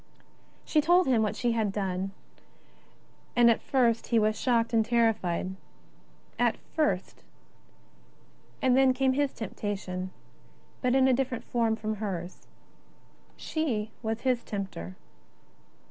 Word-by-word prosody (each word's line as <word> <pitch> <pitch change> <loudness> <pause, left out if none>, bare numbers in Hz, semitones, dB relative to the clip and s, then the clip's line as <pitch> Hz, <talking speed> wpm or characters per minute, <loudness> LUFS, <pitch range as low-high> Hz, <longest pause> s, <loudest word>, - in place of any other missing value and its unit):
She 305 - +3
told 350 +4 +4
him 250 -5 +3
what 215 -2 0
she 240 -1 0
had 220 -3 0
done, 195 -1 -2 1.3
and 235 -1 +6
at 225 - 0
first 235 -4 +1
he 235 - +2
was 215 0 +3
shocked 235 0 +1
and 225 -1 +4
terrified. 215 -6 +1 0.8
At - - +2 0.2
first 200 - -1 0.7
— - - -32
and 255 -1 +4
then 265 -1 +4
came 265 0 +2
his 285 0 +1
temptation, 195 -4 -4 0.7
but 250 0 +2
in 265 0 +5
a 260 - +4
different 255 -1 -1
form 230 -2 0
from 215 -1 -4
hers. 185 -4 -5 0.9
She 230 -10 -2
was 225 -1 -3
his 250 -3 +1
tempter. 190 - -5
230 Hz, 130 wpm, -28 LUFS, 205-255 Hz, 1.3 s, and